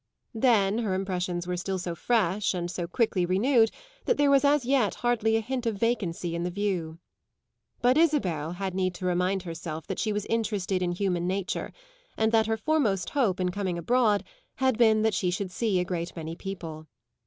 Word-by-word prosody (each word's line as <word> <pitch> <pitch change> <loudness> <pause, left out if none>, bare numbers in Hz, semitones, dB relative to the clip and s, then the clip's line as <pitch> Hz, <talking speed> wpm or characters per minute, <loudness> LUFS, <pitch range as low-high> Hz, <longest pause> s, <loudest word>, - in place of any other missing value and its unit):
Then 220 -3 +3
her 210 -5 -1
impressions 180 -2 -2
were 180 0 -2
still 190 +2 -2
so 175 -1 -4
fresh 200 0 +1
and 175 -1 -3
so 175 -2 -4
quickly 195 -1 +1
renewed 225 +6 +3 0.4
that 485 - +2
there 285 -1 +4
was 275 0 +5
as 285 -2 +3
yet 255 -5 +2
hardly 225 -2 +2
a - - 0
hint 250 +1 -3
of 225 - 0
vacancy 195 -6 -1
in 170 - -2
the 175 - -1
view. 180 -4 -2 0.9
But 250 +4 +4
Isabel 185 - +1
had 190 0 -4
need 185 -1 -1
to 185 - -6
remind 180 +1 +1
herself 165 -2 -6
that 190 - -4
she 215 - 0
was 205 -1 -2
interested 205 -5 -1
in 175 -1 0
human 180 -2 -1
nature 190 0 -2 0.5
and 220 0 +2
that 220 -1 +3
her 225 0 0
foremost 220 - 0
hope 230 -11 +1
in 180 -1 +1
coming 185 -2 -2
abroad 215 +3 +2 0.3
had 260 -2 +2
been 220 -2 +4
that 220 -1 +2
she 180 -1 0
should 185 +1 -3
see 200 -1 0
a 180 - 0
great 175 -2 -4
many 165 -1 -5
people. 165 -5 -7
195 Hz, 195 wpm, -27 LUFS, 180-225 Hz, 0.9 s, was